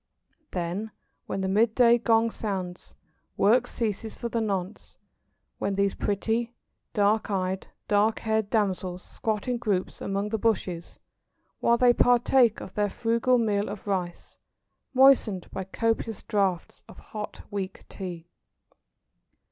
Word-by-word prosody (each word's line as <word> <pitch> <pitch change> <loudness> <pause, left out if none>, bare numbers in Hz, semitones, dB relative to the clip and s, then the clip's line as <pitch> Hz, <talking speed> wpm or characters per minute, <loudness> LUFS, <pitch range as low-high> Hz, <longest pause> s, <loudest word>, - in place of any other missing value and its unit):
Then 180 +5 -3 0.4
when 195 - -2
the 190 - -1
mid 220 +4 +2
day 240 -1 +6
gong 230 0 +3
sounds, 185 -5 -5 0.4
work 240 +5 +4
ceases 220 -1 -3
for 235 - -4
the 230 0 -1
nonce, 195 -2 -4 0.6
when 200 - -1
these 200 0 +1
pretty, 225 +4 -1 0.4
black 210 +1 +2
eyed, 190 -1 -1 0.2
dark 210 +2 +3
haired 220 -2 0
damsels 190 -4 -1
squat 215 +1 -3
in 245 -1 0
groups 200 -5 -2
among 200 +1 -2
the 220 0 -1
bushes, 185 -6 -1 0.6
while 235 - +3
they 245 0 +5
partake 245 -1 +4
of 185 - -9
their 205 -1 +1
frugal 235 +4 +2
meal 210 -3 +1
of 205 -1 -7
rice, 185 -4 -4 0.6
moistened 255 -8 +5
by 190 - -4
copious 225 +2 -1
draughts 195 -5 -1
of - - -13
hot 210 -1 -7
weak 195 -2 -4
Tea. 175 -4 -7
210 Hz, 130 wpm, -27 LUFS, 190-230 Hz, 0.6 s, day